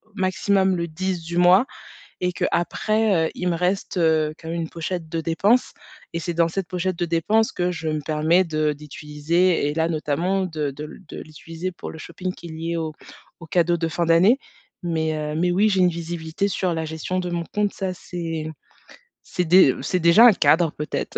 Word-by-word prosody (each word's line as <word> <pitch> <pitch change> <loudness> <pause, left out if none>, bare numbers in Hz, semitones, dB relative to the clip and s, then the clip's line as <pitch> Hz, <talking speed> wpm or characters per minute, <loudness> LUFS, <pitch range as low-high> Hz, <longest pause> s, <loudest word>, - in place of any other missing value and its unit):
maximum 190 0 +1
le 170 0 -2
10 180 +2 -3
du 170 +1 -6
mois 180 +7 +6 0.5
et 180 0 -1
qu'après, 200 -1 +1
heu, - - -12
il 180 - -3
me 175 - +1
reste, 180 +4 -1
heu, 160 -2 +2
quand 160 - -9
même 170 0 -2
une 160 - -4
pochette 170 0 -4
de 165 +1 -3
dépenses 200 +10 +2 0.4
et 165 - -3
c'est 170 +1 -3
dans 170 0 +2
cette 190 +1 -3
pochette 185 0 -2
de 175 - +1
dépenses 210 +8 +1
que 180 0 0
je 165 -2 -5
me 155 -1 -1
permets 155 +4 +2
de 155 -2 0
d'utiliser 150 +3 0
et - - -2
là 160 +1 +1
notamment 170 +4 0
de 155 -5 -3
de 145 +3 -8
le 150 - -9
de - - -8
l'utiliser 165 +3 -7
pour 175 - -8
le - - -9
shopping 185 +3 -5
qui 170 - -11
est - - -8
lié 165 +1 -4
aux 160 -1 -2 0.5
aux 165 - -10
cadeaux 175 +1 +2
de 165 0 -1
fin 170 +1 -1
d'année, 180 +10 +5 0.5
mais, 160 -2 -1
heu, 150 0 -3
mais 180 0 +2
oui, 205 +5 +3
j'ai 190 -2 +1
une 180 - +5
visibilité 170 +3 -3
sur 185 -2 -1
la 160 -1 -2
gestion 160 +4 -3
de 180 -1 -3
mon 170 -1 -3
compte, 210 -1 0
ça, 190 -2 -3
c'est 165 -3 -5 0.7
c'est 180 - -2
dé 170 -5 +6
c'est 180 +6 -1
déjà 170 +8 +7
un 235 - +8
cadre, 160 0 +3
peut-être. 150 - -4
170 Hz, 205 wpm, -23 LUFS, 160-185 Hz, 0.7 s, un